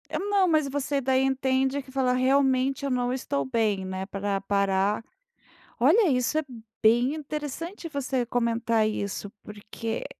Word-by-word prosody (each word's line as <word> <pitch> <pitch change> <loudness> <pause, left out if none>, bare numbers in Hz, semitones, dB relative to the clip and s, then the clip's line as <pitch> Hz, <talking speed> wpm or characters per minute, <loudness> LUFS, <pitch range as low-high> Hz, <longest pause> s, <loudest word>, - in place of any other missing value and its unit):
Eh, - - 0
não, 400 -1 +2
mas 310 -4 +2
você 280 0 -1
daí 260 0 +2
entende 265 +1 +1
que 270 - -17
fala: 260 -1 +1
"Realmente 265 +1 +2
eu 280 - -1
não 250 0 0
estou 140 - -2
bem, 200 +5 0
né, 190 0 -4
para 195 0 -2
parar", 200 +1 +1 0.8
olha, 335 - +4
isso 250 +3 +1
é 315 - +1 0.4
bem 240 +5 +4
interessante 305 +4 -6
você 265 -4 -2
comentar 230 -2 +1
isso 205 -1 -4
porque 210 +2 -6
255 Hz, 145 wpm, -26 LUFS, 215-280 Hz, 0.8 s, olha